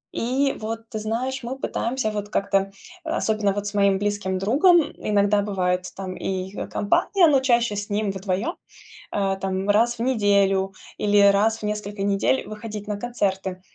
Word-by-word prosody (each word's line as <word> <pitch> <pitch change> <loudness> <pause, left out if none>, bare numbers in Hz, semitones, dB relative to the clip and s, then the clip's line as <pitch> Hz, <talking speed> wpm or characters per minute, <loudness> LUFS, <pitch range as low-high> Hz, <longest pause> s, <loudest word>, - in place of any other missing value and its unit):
И 270 +4 0
вот, 225 +1 -5
ты 220 -4 -4
знаешь, 245 +5 -2
мы 255 +3 -4
пытаемся 250 -3 -2
вот 205 -1 -4
как-то, 195 -1 0 0.3
особенно 215 -9 0
вот 205 +1 -3
с 205 - -4
моим 200 -1 +3
близким 205 -2 -1
другом, 300 - +4
иногда 205 0 +2
бывает 180 -3 -1
там 185 -1 -5
и 190 0 -3 0.2
компания, 345 - +2
но 280 -3 +4
чаще 235 -4 +2
с 205 +2 -4
ним 205 0 0
вдвоем, 195 - -2 0.6
а, 195 -1 0
там, 190 +1 -3
раз 230 +3 +3
в - - -3
неделю 200 -5 +2 0.2
или 205 0 +3
раз 220 +3 +2
в - - -14
несколько 210 -1 -4
недель 200 +6 +1
выходить 210 -1 -7
на 210 - -2
концерты. 195 -5 -2
205 Hz, 160 wpm, -23 LUFS, 195-230 Hz, 0.6 s, другом